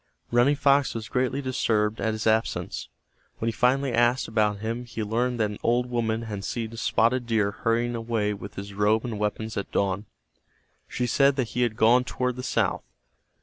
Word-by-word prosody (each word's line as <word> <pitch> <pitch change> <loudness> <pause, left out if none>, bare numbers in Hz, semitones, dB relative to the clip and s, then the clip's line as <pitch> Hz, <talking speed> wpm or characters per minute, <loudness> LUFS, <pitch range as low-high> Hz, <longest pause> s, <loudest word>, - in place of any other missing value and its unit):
Running 120 +5 +4
Fox 140 -1 +3
was 110 -2 -4
greatly 130 +2 0
disturbed 110 -4 0
at 110 - 0
his 110 - -4
absence. 110 0 0 0.5
When 115 - -3
he - - +2
finally 130 +3 +1
asked 120 +2 +2
about 105 -2 +1
him 115 +3 -3
he 115 -2 -5
learned 120 +3 -1
that 105 -2 +1
an 105 - -8
old 125 +1 +1
woman 115 -1 0
had 105 -3 -5
seen 115 +1 -4
Spotted 120 +1 +1
Deer 110 -3 +1
hurrying 115 +3 0
away 115 -3 -1
with 100 0 -9
his 100 +1 -7
robe 105 +3 +2
and 110 -4 -4
weapons 105 +1 -2
at 100 - -4
dawn. 100 +1 -1 0.8
She 125 - -2
said 140 +3 +3
that 130 -5 -1
he 125 - -2
had 115 -3 0
gone 120 +3 +5
toward 125 0 -2
the 125 - -5
south. - - 0
115 Hz, 190 wpm, -26 LUFS, 110-125 Hz, 0.8 s, gone